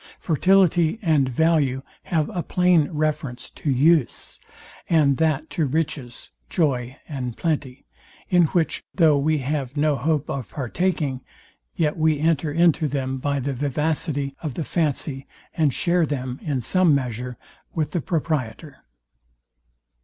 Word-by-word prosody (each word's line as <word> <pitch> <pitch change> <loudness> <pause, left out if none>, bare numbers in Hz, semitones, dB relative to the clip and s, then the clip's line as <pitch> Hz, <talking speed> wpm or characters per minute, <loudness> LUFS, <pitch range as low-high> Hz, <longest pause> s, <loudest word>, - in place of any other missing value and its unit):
Fertility 175 +1 +3
and 150 -6 +3
value 140 -2 +1 0.2
have 160 -3 0
a 175 - 0
plain 180 -4 +3
reference 150 -5 -2
to 150 - -4
use; 145 +1 +2 0.5
and 145 -5 +4
that 155 -1 +1
to 155 -4 0
riches, 140 -4 -3 0.2
joy, 130 -5 0
and 125 -6 -5
plenty; 145 -5 -2 0.4
in 175 -2 +4
which 165 +1 0
though 160 -5 +5
we 155 +2 +2
have 140 0 -3
no 150 0 +2
hope 150 +2 0
of 130 -5 -4
partaking, 145 -1 -2 0.5
yet 150 -1 0
we 155 -1 +2
enter 160 -1 +1
into 165 0 +3
them 135 -1 -2
by 140 +1 -1
the 135 +1 -2
vivacity 145 +1 -1
of 150 -6 -4
the 165 - -2
fancy, 145 -4 -2 0.3
and 155 -4 +2
share 170 +4 +1
them, 130 -3 -4
in 140 -5 -2
some 175 - +3
measure, 125 -2 -3 0.4
with 155 -2 -1
the 175 - -1
proprietor. 145 -2 -3
150 Hz, 135 wpm, -23 LUFS, 135-160 Hz, 0.5 s, though